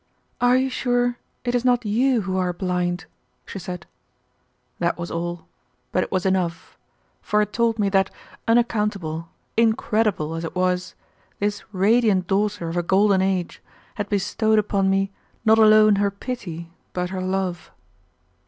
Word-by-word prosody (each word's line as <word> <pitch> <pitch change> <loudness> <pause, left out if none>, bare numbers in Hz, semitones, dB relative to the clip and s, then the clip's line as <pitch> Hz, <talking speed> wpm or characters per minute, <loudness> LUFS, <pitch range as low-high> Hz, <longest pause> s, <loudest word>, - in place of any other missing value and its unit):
"Are 245 +1 +5
you 260 +1 +2
sure 245 -1 0 0.2
it 245 - -1
is 245 -1 +1
not 245 -2 +2
you 240 +3 +2
who 190 -1 -3
are 180 -1 0
blind?" 180 -1 -2 0.4
she 195 - -7
said. 180 -3 -6 0.9
That 170 0 0
was 170 0 -5
all, 175 0 -4 0.5
but 185 - +2
it - - -7
was 185 -1 0
enough, 180 -3 -1 0.5
for 210 - +1
it 210 -1 0
told 235 -1 +1
me 205 -2 +1
that, 195 -1 +2 0.4
unaccountable, 210 -8 0 0.3
incredible 220 -7 +1
as 165 0 -4
it 165 - -5
was, 180 0 0 0.4
this 205 0 -1
radiant 205 -1 +3
daughter 200 -1 0
of 165 +2 -3
a - - +3
golden 190 +2 +3
age 190 -2 -1 0.3
had 205 -1 -4
bestowed 215 +2 +1
upon 200 -2 +2
me 195 0 +1 0.3
not 220 0 +6
alone 215 -1 +6
her 200 0 +2
pity, 190 -6 -6 0.2
but 180 0 -2
her 190 -1 -3
love. 185 -2 -2
195 Hz, 155 wpm, -23 LUFS, 180-220 Hz, 0.9 s, not